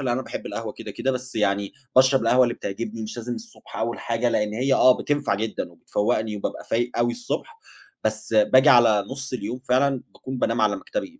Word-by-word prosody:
اللي 125 -3 0
أنا 130 +2 -1
باحب - - -7
القهوة 115 -2 -5
كده، 110 -2 -9
كده، 135 - -1
بس 125 0 -6
يعني 100 -2 0 0.2
باشرب 130 -1 +5
القهوة 125 +3 +4
اللي 120 - -1
بتعجبني، 110 +2 -5
مش 110 +2 -6
لازم 120 +1 -4
الصُبح 230 - -12
أول 115 +1 -2
حاجة، 115 +1 0
لإن 105 -2 0
هي 130 +3 +2
آه، 130 0 +6
بتنفع 145 -7 0
جدًا 110 +1 -3
وبتفوّقني 105 +1 -1
وبابقى 100 - -5
فايق 120 +2 +1
أوي 120 0 +2
الصُّبح، 250 - -5 0.5
بس 110 0 -2
باجي 130 +7 +5
على 115 -6 +6
نُص 135 -1 -6
اليوم 125 +1 -4
فعلًا 130 +1 +2
باكون 130 -1 -6
بانام 115 -2 0
على 105 -2 +2
مكتبي 260 - -6
120 Hz, 200 wpm, -24 LUFS, 110-130 Hz, 0.5 s, آه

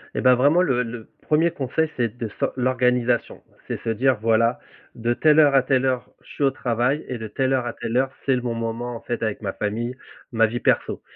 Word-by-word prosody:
Et - - -1
bah, 125 -1 +6
vraiment, 145 +8 +4
le 125 -8 +1
le 115 -1 -8
1er 160 +3 +2
conseil, 150 +4 -1
c'est 120 -2 -1
de 115 - -3
s'o - - +2
l'organisation. 125 -1 0 0.2
C'est - - -4
se - - -2
dire, 125 +3 +2
voilà, 115 +1 +2 0.4
de 120 0 0
telle 155 +4 +4
heure 145 -3 +5
à 135 - +5
telle 135 -1 +1
heure, 130 -2 -1
je - - -19
suis - - -3
au 135 - +4
travail 125 +5 -1
et 125 - -4
de 110 -1 -6
telle 130 +4 0
heure 130 -2 0
à 120 - -3
telle 120 0 -3
heure, 135 +1 +1
c'est 135 - +3
le 125 - -2
bon 120 -1 -2
moment, 115 +1 -4
en 115 - -8
fait, 120 - -4
avec 110 -1 -2
ma 95 -3 -3
famille, 115 +4 -3 0.4
ma 115 -2 +3
vie 115 +2 -3
perso, - - +1
125 Hz, 235 wpm, -23 LUFS, 115-130 Hz, 0.4 s, bah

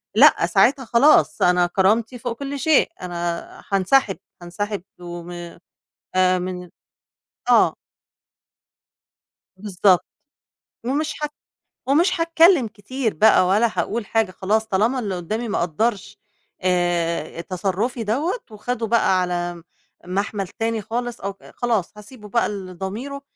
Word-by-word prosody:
لأ - - +6
ساعتها 270 -1 +3
خلاص 250 +7 +4
أنا 180 0 +4
كرامتي 220 +7 +1
فوق 235 -1 -4
كل 280 0 -4
شيء، 305 +2 +3
أنا 175 -1 -3 0.3
هانسحب، 195 +2 +2 0.2
هانسحب 195 +3 -4 0.2
وم 175 0 -8 0.9
آآ 185 0 +4
من 180 -1 -5 0.8
آه. - - +5 1.8
بالضبط 190 -2 +2 0.8
ومش 295 +5 -1
ه - - +1 0.6
ومش 335 +6 +2
هاتكلّم 330 - +4
كتير 225 +3 -3
بقى 215 +1 +5
ولا 210 +5 +3
هاقول 225 -1 -1
حاجة 225 -3 +1
خلاص 215 +4 0
طالما 220 +6 +1
اللي 200 -6 -2
قُدّامي 215 +7 -3
ما - - -1
قدّرش 195 +5 -2 0.4
آآ 175 -3 0
تصرّفي 195 +7 -2
دوّة، 290 - -1
وخَده 225 +2 -3
بقى 215 -4 +3
على 175 -1 -3 0.4
مَحمل 195 +1 -2
تاني 225 +2 -2
خالص، 240 +3 -4
أو 200 +1 -3
ك 195 - -24
خلاص 230 -7 -1
هاسيبه 210 0 -12
بقى 235 +3 +1
لضميره 200 +8 -6
210 Hz, 120 wpm, -22 LUFS, 180-240 Hz, 1.8 s, لأ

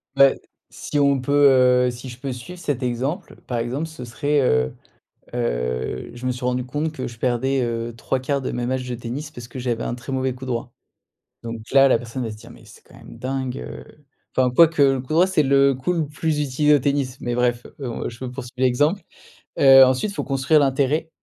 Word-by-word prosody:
Bah, 135 0 +7 0.4
si 145 - -3
on 140 -1 +3
peut, 130 -2 +4
heu, - - 0
si 125 +2 -9
je 120 +1 -10
peux 135 0 -4
suivre 175 +9 -8
cet 140 -6 -2
exemple, 135 - -3
par 120 -2 -2
exemple, 130 +7 -2
ce 160 -6 -10
serait, 145 +4 0
heu, 65 - +2 0.6
heu, 60 - -2
je 120 +1 -7
me 125 - +1
suis 125 0 -7
rendu 125 0 0
compte 150 +5 -3
que 130 -4 -5
je 115 -2 -12
perdais, 130 +2 0
heu, 115 0 -3
3/4 135 +3 -2
de - - -3
mes 120 0 -2
matchs 130 0 -2
de 125 - -3
tennis 125 +6 -6
parce 120 -4 -10
que 130 - -9
j'avais 120 -2 -2
un 120 - -3
très 125 +2 -8
mauvais 130 -1 -1
coup 130 +1 -9
droit. 120 -1 -3 0.7
Donc 115 0 -5
là, 135 0 +6
la 125 - +4
personne 120 +2 -5
va 110 - -4
se 105 - -9
dire: - - -14
«Mais - - -16
c'est - - -16
quand - - -19
même - - -13
dingue, 130 0 -3
heu», - - -8 0.5
enfin, 130 -1 +4
quoique, 160 +1 +5
le 135 -1 +4
coup 130 +4 -5
droit, 175 +4 +5
c'est 170 -5 +2
le 140 0 +4
coup 130 +8 -1
le 160 -4 -1
plus 150 +1 -2
utilisé 150 +2 +2
au 145 - +5
tennis, 135 -1 -1
mais 120 -1 -2
bref, 120 0 0
heu, 125 -4 -4
je 120 +3 -8
poursuis 125 -1 -7
l'exemple, 145 +10 +2 0.6
heu, 135 -1 +9
ensuite, 130 +11 +1
il - - -13
faut - - -3
construire 135 +3 +2
l'intérêt. 140 +4 +1
130 Hz, 220 wpm, -22 LUFS, 120-140 Hz, 0.7 s, heu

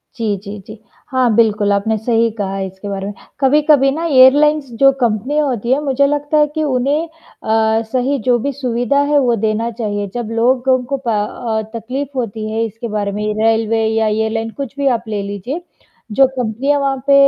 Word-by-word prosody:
जी, 220 -4 -1
जी, 205 0 -7
जी, 215 0 -10 0.3
हाँ, 255 -3 +2
बिल्कुल, 215 -3 +2
आपने 220 +2 0
सही 230 +1 +1
कहा 195 -1 -3
इसके 190 +1 -6
बारे 195 0 -4
में। 205 - -5 0.3
कभी-कभी 290 0 +4
ना 325 +4 -3
एयरलाइंस 290 0 +5
जो 275 0 +7
कंपनियाँ 250 +7 +1
होती 240 -1 -2
हैं 275 - +1
मुझे 280 -1 +1
लगता 290 +1 0
है 300 0 +4
कि 310 - 0
उन्हें 285 +4 0 0.4
अ, 220 0 +2
सही 265 +2 0
जो 245 - +4
भी 280 +5 -2
सुविधा 250 +1 0
है 295 - +4
वो 245 -3 +2
देना 220 +2 -1
चाहिए, 205 -3 -3
जब 240 -2 -3
लोगों 255 +2 +2
को 275 +3 -3
प - - +2
अ, 220 +1 -1 0.2
तकलीफ 265 +5 -5
होती 220 -3 -3
है 225 +1 0
इसके 225 +2 -6
बारे 205 -1 -2
में 210 +1 -4 0.2
रेलवे 225 0 +2
या 220 0 +1
एयरलाइन 220 +1 -1
कुछ 275 -1 -5
भी 280 - 0
आप 225 - -15
ले 210 -2 -2
लीजिए। 205 - -5 0.5
जो 265 +5 +5
कंपनियाँ 250 +5 0
वहाँ 275 -1 0
पे 280 - +5
235 Hz, 190 wpm, -17 LUFS, 220-275 Hz, 0.5 s, जो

